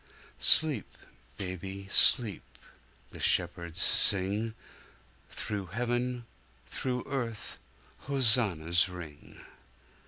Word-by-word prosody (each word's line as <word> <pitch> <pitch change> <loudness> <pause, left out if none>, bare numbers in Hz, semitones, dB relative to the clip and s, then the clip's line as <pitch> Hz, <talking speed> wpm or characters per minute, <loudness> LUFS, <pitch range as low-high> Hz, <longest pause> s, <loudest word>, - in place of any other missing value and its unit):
Sleep, 150 -9 +3 0.4
baby, 95 +1 -7
sleep! 110 -6 +4 0.7
The - - -12
shepherds 85 -2 0
sing:Through 100 0 0
heaven, 120 +4 -3 0.4
through 125 -1 -4
earth, 120 -5 -6 0.5
hosannas 105 - +2
ring. 80 -5 -12
105 Hz, 65 wpm, -29 LUFS, 90-120 Hz, 0.7 s, sleep